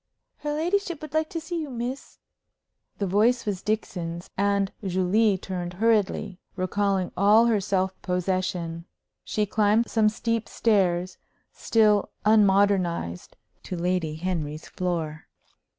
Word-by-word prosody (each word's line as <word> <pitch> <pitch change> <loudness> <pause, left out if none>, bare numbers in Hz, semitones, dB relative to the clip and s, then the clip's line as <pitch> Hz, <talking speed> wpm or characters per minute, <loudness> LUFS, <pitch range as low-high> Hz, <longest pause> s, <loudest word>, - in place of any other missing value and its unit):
"Her 295 - -4
ladyship 350 +1 -1
would 305 -2 -8
like 315 0 +1
to 330 - -4
see 330 +1 -4
you, 300 - -5
miss." 250 +2 -5 0.8
The 200 - -1
voice 220 +6 +2
was 200 -3 -2
Dixon's, 175 -5 -3
and 200 0 +1
Julie 190 +3 +2
turned 180 -2 -5
hurriedly, 205 -2 +1 0.2
recalling 195 0 0
all 210 +4 +5
her 225 -4 +2
self 190 -1 0
possession. 180 -2 -2 0.4
She 210 - -1
climbed 210 +2 +2
some 220 -2 +4
steep 230 +1 -2
stairs, 185 -5 +1 0.3
still 210 -3 +2 0.2
unmodernized, 195 - +2 0.2
to 180 - -6
Lady 170 -3 -1
Henry's 155 -3 -3
floor. 165 -4 -3
200 Hz, 120 wpm, -25 LUFS, 180-220 Hz, 0.8 s, all